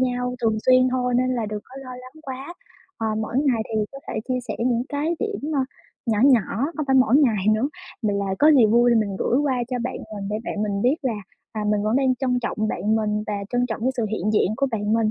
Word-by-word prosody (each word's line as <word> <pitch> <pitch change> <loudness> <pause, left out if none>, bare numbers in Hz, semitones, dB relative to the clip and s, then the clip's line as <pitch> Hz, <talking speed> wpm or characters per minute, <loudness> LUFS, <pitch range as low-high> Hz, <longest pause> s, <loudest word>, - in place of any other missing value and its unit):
nhau 250 -1 0
thường 220 -1 +2
xuyên 255 0 +6
thôi, 250 -1 0
nên 255 +1 +1
là 230 -3 -1
đừng 210 0 -4
có 260 - -14
lo 255 - -9
lắng 255 +5 -13
quá. 270 +4 -7 0.4
Ờ, 225 - -1
mỗi 220 +2 -4
ngày 265 -6 +2
thì 215 -1 +1
có 275 - -8
thể - - -4
chia 255 -1 0
sẻ - - -2
những 235 0 +1
cái 300 +3 -1
điểm, 410 -9 -3
ơ, 280 - +2 0.5
nhỏ 220 -3 +1
nhỏ, 265 -4 +6 0.4
không 305 - -2
phải 265 -1 +3
mỗi 255 -1 +5
ngày 230 -10 +3
nữa 220 +6 +2 0.3
mà 210 -2 +1
là 200 -1 -1
có 300 - +6
gì 255 -6 +6
vui 235 +2 +4
mình 210 -4 +1
gửi 245 - +1
qua 285 -2 +1
cho 250 - -2
bạn 255 +2 -3 0.2
mình 195 -1 -5
để 210 - -1
bạn 210 - -3
mình 200 -1 -1
biết 255 +5 +3
là, 255 -3 0 0.4
à, 215 -1 -3
mình 210 0 +1
vẫn 215 +3 +1
đang 265 -1 +3
trân 250 -1 0
trọng 215 -2 -2
bạn 215 +1 0
mình, 210 -1 -1
và 210 - -2 0.2
trân 245 0 +1
trọng 225 -3 -4
cái 255 - +2
sự 235 -3 0
hiện 215 0 -1
diện 210 -2 +2
của 275 - +1
bạn 210 -2 -1
mình. 225 -1 +2
245 Hz, 255 wpm, -23 LUFS, 215-260 Hz, 0.5 s, xuyên